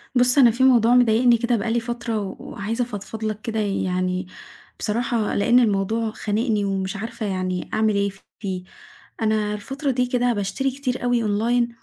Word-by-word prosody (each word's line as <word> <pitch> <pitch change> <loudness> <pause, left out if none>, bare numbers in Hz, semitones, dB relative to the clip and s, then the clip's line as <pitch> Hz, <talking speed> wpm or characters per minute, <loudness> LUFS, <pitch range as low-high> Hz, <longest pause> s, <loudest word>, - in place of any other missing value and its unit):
بُص 250 +2 +4
أنا 245 -4 +7
في 245 +3 0
موضوع 245 -2 +5
مضايقني 240 0 +5
كده 235 +1 +1
بقى 225 +3 -2
لي 235 - +2
فترة، 235 -1 -3
و 195 -2 -5
وعايزه 225 +5 -3
أفضفض 220 -1 -7
لَك 215 -1 -2
كده 220 -1 -3
يعني، 185 -2 -1 0.5
بصراحة 230 0 -1
لأن 235 +5 +4
الموضوع 220 0 +1
خانقني 215 0 -1
ومش 195 0 -2
عارفة 220 +1 -5
يعني 185 -2 -2
أعمل 215 -1 +2
إيه 200 0 +1 0.3
فيه، 190 -3 -4 0.6
أنا 215 -1 +1
الفترة 270 +7 -3
دي 250 0 +1
كده 245 -1 +1
باشتري 220 +6 -1
كتير 255 -2 -3
أوي 245 -1 +1
online، 230 +3 +1
225 Hz, 170 wpm, -23 LUFS, 205-245 Hz, 0.6 s, أنا